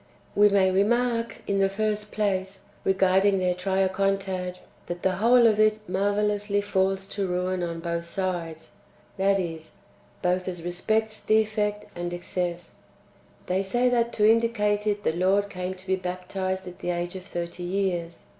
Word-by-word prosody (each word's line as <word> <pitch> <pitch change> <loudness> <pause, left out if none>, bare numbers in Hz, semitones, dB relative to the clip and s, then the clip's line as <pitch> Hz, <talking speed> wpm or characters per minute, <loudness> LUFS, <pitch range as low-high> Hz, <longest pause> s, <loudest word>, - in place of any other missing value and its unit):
1. 205 +1 +6
We - - +3
may^ 190 -2 +4
remark, 230 +3 +1
in 200 0 0
the 195 0 +3
first 210 +1 -2
place, 195 -2 -1 0.2
regarding 195 +1 +3
their 180 -1 +1
Triacontad, 190 0 0 0.3
that 175 0 -5
the 185 -1 +1
whole 235 +3 +5
of 215 -2 +4
it 215 0 +2
marvellously 205 +2 +1
falls 195 -1 0
to 200 -1 -2
ruin 180 0 -1
on 170 -1 -3
both 170 0 -3
sides, 170 -3 -4 0.5
that 195 +1 +3
is, 165 -3 -5 0.5
both 180 +1 +1
as 175 -3 -5
respects 215 +5 -1
defect 210 -1 +1
and 175 0 -4
excess. 175 0 -4 0.7
They 185 +1 0
say 240 +6 +1
that 235 -1 +1
to 210 -1 +4
indicate 215 -2 +2
it 205 -1 0
the - - +1
Lord 195 +4 +2
came 180 -1 -4
to 185 0 -13
be 190 0 +1
baptized 185 +1 -3
at 180 - -9
the - - -4
age 175 +1 -2
of 185 - -5
thirty 175 -2 -5
years. 175 -2 -2
190 Hz, 160 wpm, -26 LUFS, 180-210 Hz, 0.7 s, 1